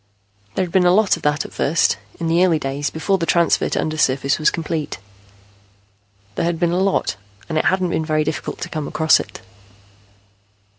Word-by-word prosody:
There 185 - +1
had 175 - -10
been 180 -1 +3
a - - +5
lot 205 +2 +4
of - - -11
that 150 0 0
at - - -10
first, 160 +4 +1 0.2
in 170 - -3
the 165 +2 +3
early 175 -4 +3
days 140 0 -3
before 190 +4 -1
the 165 - -2
transfer 170 -1 +2
to - - -1
undersurface 140 -3 0
was 155 - +4
complete. 160 -2 -4 1.4
There 165 - -1
had 170 -1 -1
been 170 -1 +1
a 175 - 0
lot, 190 - 0 0.3
and 160 - -4
it 155 - +1
hadn't 185 -2 +1
been 160 - 0
very 155 -1 +1
difficult 150 - -4
to 180 - -4
come 155 -3 -4
across 160 0 +3
it. - - -8
165 Hz, 195 wpm, -20 LUFS, 155-175 Hz, 1.4 s, a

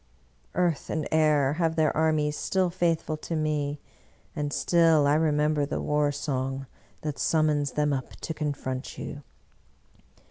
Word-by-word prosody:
Earth 175 -4 0
and 160 -1 -2
air 150 -3 +3
have 165 -2 +1
their 155 -2 +2
armies 155 -1 +2
still 185 +1 0
faithful 165 -3 0
to 165 +2 -5
me, 150 -2 -1 0.6
and 145 -2 -2
still 165 -2 +4
I 145 - +4
remember 150 -1 +2
the 140 - -2
war 150 -1 +1
song 135 -2 -3 0.4
that 150 -2 -4
summons 150 -3 +1
them 150 -1 +1
up 130 -2 -4
to 160 - -3
confront 140 -3 -4
you! 145 -1 -6
150 Hz, 140 wpm, -27 LUFS, 145-160 Hz, 0.6 s, still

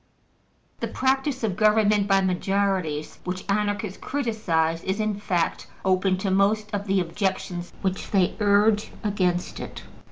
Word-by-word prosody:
The - - -2
practice 265 0 0
of 205 -5 0
government 210 -1 +3
by 195 -1 +4
majorities, 185 -4 -1
which 185 +1 -4
Anarchists 205 -1 -1
criticise, 175 - -1
is 190 +3 -2
in 215 -1 +1
fact 180 -5 -1 0.2
open 185 0 +2
to 190 +1 -1
most 210 +2 +2
of 205 0 -2
the 195 0 +2
objections 185 0 -2
which 190 -1 -2
they 190 -3 +2
urge 210 +1 +3
against 185 -4 0
it. - - -7
195 Hz, 135 wpm, -25 LUFS, 185-210 Hz, 0.2 s, by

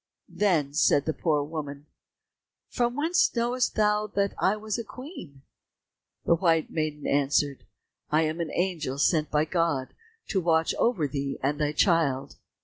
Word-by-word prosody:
Then 160 -9 +1
said 145 -1 +3
the 160 - -1
poor 150 -4 0
woman, 145 -2 -6 0.8
"From 240 -1 0
whence 320 +5 +2
knowest 240 +1 0
thou 210 0 +2
that 200 0 +1
I 190 +3 +2
was 215 +1 -4
a - - -3
queen?" 215 - -11 0.8
The - - +4
white 165 -2 +1
maiden 155 -2 -3
answered, 140 0 +1 0.4
"I 155 +2 +3
am 160 +2 -2
an 165 - -3
angel 170 -7 -2
sent 155 0 +2
by 150 +1 +2
God, 160 -6 -1 0.4
to 190 - +1
watch 165 -1 +2
over 205 -11 +2
thee 140 0 -3
and 145 +2 0
thy 150 0 +1
child." 150 -6 +1
160 Hz, 150 wpm, -27 LUFS, 145-200 Hz, 0.8 s, The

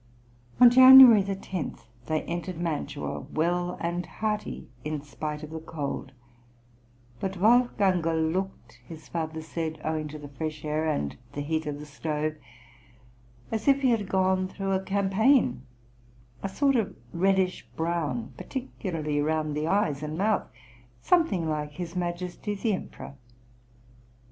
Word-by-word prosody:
" 120 - -30
On 245 -1 +9
January 255 -3 +10
10 190 -3 -4 0.3
they 155 0 0
entered 175 0 -5
Mantua 160 -3 -3
well 175 +2 -1
and 175 +1 -2
hearty 215 -1 -3 0.2
in 150 0 -3
spite 150 +1 -5
of 155 - -8
the 160 - -5
cold; 145 -4 -5 1.1
but 190 -1 -2
Wolfgangerl 185 -7 +2
looked, 190 +1 -5
his 160 -4 -11
father 160 -1 -4
said, 160 0 -4
owing 155 -1 -2
to 150 +1 -8
the 145 -1 -9
fresh 155 +1 -5
air 155 +1 -1
and 75 - -2 0.2
the 145 - -4
heat 155 +1 -2
of 145 -1 -3
the 150 - -8
stove, 150 +1 -3 1.2
"as 225 +3 -3
if 275 0 +5
he 255 - +4
had 210 -4 0
gone 185 0 +2
through 195 +1 -4
a 190 0 +1
campaign, 200 - +2 0.8
a 195 - -3
sort 275 +7 +2
of 215 -5 0 0.2
reddish 190 +1 +1
brown, 160 -8 -2
particularly 165 - -3
round 155 0 -1
the 150 +1 -1
eyes 165 -7 +1
and 155 +1 -4
mouth, 210 +3 +1 0.5
something 260 - +2
like 150 -1 -3
his 175 +1 -6
Majesty 180 +3 -3
the 210 +2 0
Emperor." 185 - -7
170 Hz, 140 wpm, -27 LUFS, 155-195 Hz, 1.2 s, January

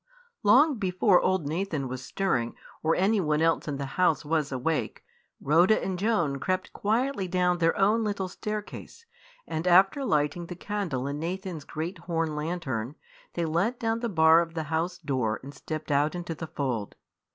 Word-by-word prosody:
Long 260 +5 +5
before 185 0 +3
old 185 -4 +1
Nathan 160 -3 -2
was 130 0 -6
stirring, 125 -10 -1 0.3
or 160 +1 +2
anyone 185 -6 +2
else 165 0 +1
in 145 -2 -2
the 140 - -3 0.2
house 165 -4 +3
was 155 -2 0
awake, 135 +5 -2 0.4
Rhoda 175 +9 +4
and 185 -2 -3
Joan 175 -10 +1
crept 185 +3 -2
quietly 225 -1 0
down 180 -1 +1
their 165 -1 +2
own 210 +3 +3
little 200 -3 -2
staircase, 210 - -6 0.4
and 160 +3 -3
after 190 +9 +5
lighting 155 - 0
the 175 - -6
candle 180 -9 -3
in 140 +1 -3
Nathan's 175 -1 -4
great 165 +4 -5
horn 165 -2 -2
lantern, 150 -6 -3 0.4
they 170 - 0
let 175 +10 0
down 225 -1 0
the 235 0 -2
bar 160 -2 +6
of 165 -1 -5
the 160 - -1
house 170 +2 -1
door 125 -8 -1
and 140 +2 -9
stepped 155 0 -6
out 145 +3 +2
into 175 -1 -4
the 160 0 -7
fold. 125 -9 -3
170 Hz, 170 wpm, -27 LUFS, 150-195 Hz, 0.4 s, bar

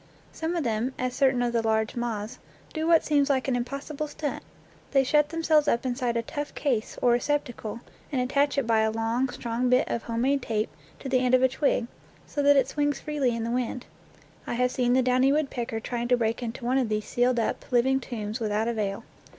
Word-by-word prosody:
Some 325 +2 -3
of 335 - 0
them, 235 +2 -1
as 255 0 -2
certain 260 -2 +2
of 240 -1 -1
the 230 - +2
large 220 0 0
moths, 235 0 -3 0.3
do 315 0 -2
what 330 -1 +5
seems 290 -1 +2
like 265 -2 +1
an 260 - +1
impossible 275 +5 -4
stunt: 295 0 -4 0.5
they 270 -1 +5
shut 295 +2 +3
themselves 320 -2 +2
up 235 +2 +1
inside 245 -2 -1
a 230 - -1
tough 290 +5 -5
case, 250 -7 -1
or 245 - +5
receptacle, 240 -3 -1 0.3
and 270 - 0
attach 280 +3 +1
it 275 - +1
by 225 -1 +3
a 220 0 +3
long, 225 +4 0
strong 245 0 -2
bit 250 +3 +3
of 235 - -2
home 230 0 -3
made 275 +2 +2
tape 215 -3 -2 0.3
to - - -5
the 260 -1 +2
end 255 0 +3
of 255 - +3
a - - +7
twig, 260 -2 0 0.4
so 290 - -3
that 285 0 +5
it 265 -2 +4
swings 290 0 0
freely 285 -6 -1
in 230 - -3
the 230 - -2
wind. 250 0 -2 0.6
I - - -2
have 250 +1 +1
seen 245 -1 +1
the 260 0 +4
downy 255 +2 +3
woodpecker 255 -6 -1
trying 240 +1 -3
to 250 0 +3
break 230 +1 -1
into 235 +1 -5
one 255 +2 +2
of 245 -4 0
these 215 0 -1
sealed 245 0 +1
up, 225 - -1
living 260 +2 +3
tombs 220 -3 -5
without 215 0 0
avail. 210 -4 -2
250 Hz, 220 wpm, -27 LUFS, 235-275 Hz, 0.6 s, a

